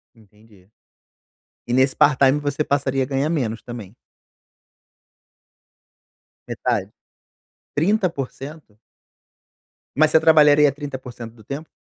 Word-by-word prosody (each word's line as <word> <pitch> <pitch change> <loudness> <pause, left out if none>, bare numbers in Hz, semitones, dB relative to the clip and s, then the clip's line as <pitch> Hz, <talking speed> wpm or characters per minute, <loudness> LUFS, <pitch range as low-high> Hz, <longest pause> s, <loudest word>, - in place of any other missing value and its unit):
Entendi. 105 -3 -23 1.0
E 120 - -2
nesse 130 +1 +2
part-time 140 0 +4
você 145 +1 -2
passaria 135 -2 0
a - - -2
ganhar 135 +2 -1
menos 120 -9 -2
também? 115 -5 -9 2.6
Metade? - - -2 0.8
30%? 155 - -2 1.2
Mas 155 +2 +4
você 160 - +5
trabalharia 150 -2 +5
30% 130 -5 -8
do 110 - -17
tempo? 140 +8 -7
135 Hz, 90 wpm, -21 LUFS, 120-150 Hz, 2.6 s, você